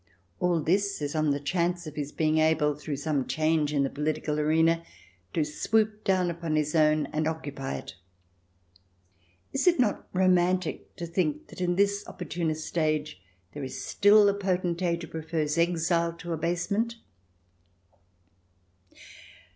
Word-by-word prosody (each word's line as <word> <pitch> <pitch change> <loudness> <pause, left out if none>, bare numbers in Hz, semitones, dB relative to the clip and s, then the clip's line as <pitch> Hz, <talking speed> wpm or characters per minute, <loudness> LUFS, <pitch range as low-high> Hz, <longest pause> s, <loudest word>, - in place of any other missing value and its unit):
All 175 -2 +2
this 200 +5 +1
is 145 -1 -3
on 155 -1 +1
the 140 0 +1
chance 175 +3 -1
of 155 - -7
his 145 -1 -4
being 155 0 +1
able, 155 -1 +3
through 150 0 -5
some 145 -2 -1
change 155 -1 +1
in 140 -2 +2
the - - +1
political 150 +1 -2
arena, 160 +2 +3 0.5
to 160 - +2
swoop 215 +8 0
down 185 -2 +2
upon 165 -2 -3
his 150 0 0
own 155 -1 +3
and 155 0 0
occupy 145 - -4
it. 70 - -7 1.6
Is 275 +7 0
it 345 -5 +5
not 225 -5 +1
romantic 185 -1 +1
to 175 - -5
think 165 -3 -2
that - - -9
in 175 -1 +1
this 200 +1 +2
opportunist 160 -2 -4
age 155 - -1 0.3
there 145 - -6
is 130 0 -6
still 205 +1 +5
a 200 - +4
potentate 180 -3 -1
who - - -6
prefers 160 -2 -2
exile 170 0 +1
to 170 0 -6
abasement 180 +8 -1
165 Hz, 145 wpm, -28 LUFS, 150-180 Hz, 1.6 s, it